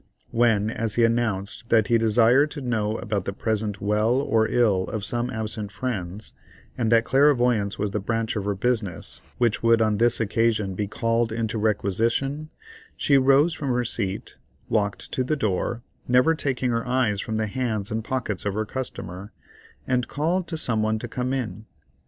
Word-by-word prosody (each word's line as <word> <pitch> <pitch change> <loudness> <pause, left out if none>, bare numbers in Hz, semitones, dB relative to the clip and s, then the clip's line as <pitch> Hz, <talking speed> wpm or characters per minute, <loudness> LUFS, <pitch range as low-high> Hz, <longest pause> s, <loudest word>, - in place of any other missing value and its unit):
When 115 -2 +2
as 115 -1 -2
he 120 - +3
announced 115 -2 -1
that 110 -3 +4
he 115 +1 +3
desired 115 +6 +4
to 150 - -7
know 110 -4 -1
about 105 -4 -3
the 100 - -3
present 105 -1 -2
well 105 +3 +1
or 115 -5 +2
ill 105 -6 +2
of 100 +2 -4
some 120 +4 0
absent 110 -3 -4
friends, 100 -3 -5 0.4
and 115 -2 0
that 115 -1 +5
clairvoyance 125 -7 +3
was 105 -1 -1
the 105 - -1
branch 115 +3 -2
of 105 -2 -2
her 100 -1 0
business 105 -5 -1 0.2
which 120 -3 +1
would 115 0 +4
on 110 -2 +1
this 120 0 +3
occasion 110 -2 +1
be 105 +2 -2
called 115 +2 0
into 110 0 -2
requisition, 115 +8 0 0.5
she 140 -1 +4
rose 140 +5 +4
from 145 -3 -4
her 125 -1 +1
seat, 100 -4 -3 0.3
walked 100 -1 -1
to 130 - 0
the 155 +5 0
door, 115 0 -1 0.2
never 125 +6 +4
taking 130 -5 -1
her 115 +1 -1
eyes 125 -5 +1
from 110 - -4
the 110 0 0
hands 110 -2 -2
and 110 +1 -2
pockets 120 -6 -3
of 100 -1 -2
her 110 0 -1
customer, 100 -5 -6 0.5
and 125 -2 0
called 170 +5 -1
to 165 - -3
some 115 -8 +1
one 110 0 +1
to 115 - -6
come 125 +2 -3
in. 110 -5 -4
115 Hz, 180 wpm, -24 LUFS, 105-125 Hz, 0.5 s, that